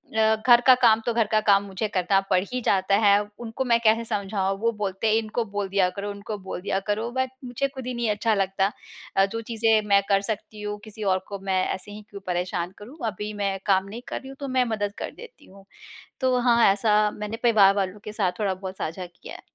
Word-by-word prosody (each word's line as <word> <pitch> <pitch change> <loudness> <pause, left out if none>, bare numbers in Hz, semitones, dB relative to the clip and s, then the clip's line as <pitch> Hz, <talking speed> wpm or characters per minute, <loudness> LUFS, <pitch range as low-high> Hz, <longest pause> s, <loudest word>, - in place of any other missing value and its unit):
अ, 220 0 +4
घर 240 -1 +8
का 260 - +10
काम, 225 -3 +6
तो 235 - 0
घर 230 -1 +2
का 215 - +4
काम 200 -1 +5
मुझे 195 +3 -3
करना 185 +1 +3
पड़ 185 - +4
ही 250 - -1
जाता 195 0 +3
है। 205 -1 +5 0.3
उनको 225 +3 -3
मैं 235 -2 +3
कैसे 225 +1 +4
समझाऊँ, 195 -2 -1
वो 230 +2 +1
बोलते 210 -1 -2
हैं, 215 - +3
“इनको 225 +1 -1
बोल 205 -1 -1
दिया 190 -2 +2
करो, 205 +1 -3
उनको 205 +2 -6
बोल 190 - -5
दिया 195 0 -1
करो”, 215 +3 -1
बट 260 +1 -1 0.2
मुझे 250 +3 -1
खुद 265 -2 -8
ही 255 - -2
नहीं 235 -2 -1
अच्छा 220 +2 +1
लगता। 195 0 +1 0.5
अ, 195 - +6
जो 225 +3 -5
चीज़ें 225 -1 +2
मैं 200 -1 +5
कर 195 -1 +4
सकती 215 0 -5
हूँ, 210 0 -4
किसी 215 0 -9
और 190 -2 +2
को 200 -1 -6
मैं 190 -1 0
ऐसे 190 +2 -8
ही 210 +1 -9
क्यों 200 -1 -9
परेशान 180 0 -2
करूँ, 240 +9 -12
अभी 210 0 -4
मैं 195 -1 0
काम 190 -2 +3
नहीं 225 +4 -7
कर - - -4
रही 265 - -12
हूँ, 270 - -9
तो 280 - -4
मैं 255 -1 +2
मदद 205 -1 -2
कर - - -5
देती 465 -11 -13
हूँ। 195 0 -17 0.6
तो 255 -1 +2
हाँ, 240 -1 +4
ऐसा 210 +1 +3
मैंने 210 +2 -5
परिवार 210 -5 +6
वालों 195 0 -2
के 210 - -6
साथ 195 -4 +1
थोड़ा-बहुत 190 -2 -3
साझा 175 +4 -4
किया 175 -1 -12
है। - - -11
210 Hz, 235 wpm, -25 LUFS, 195-230 Hz, 0.6 s, का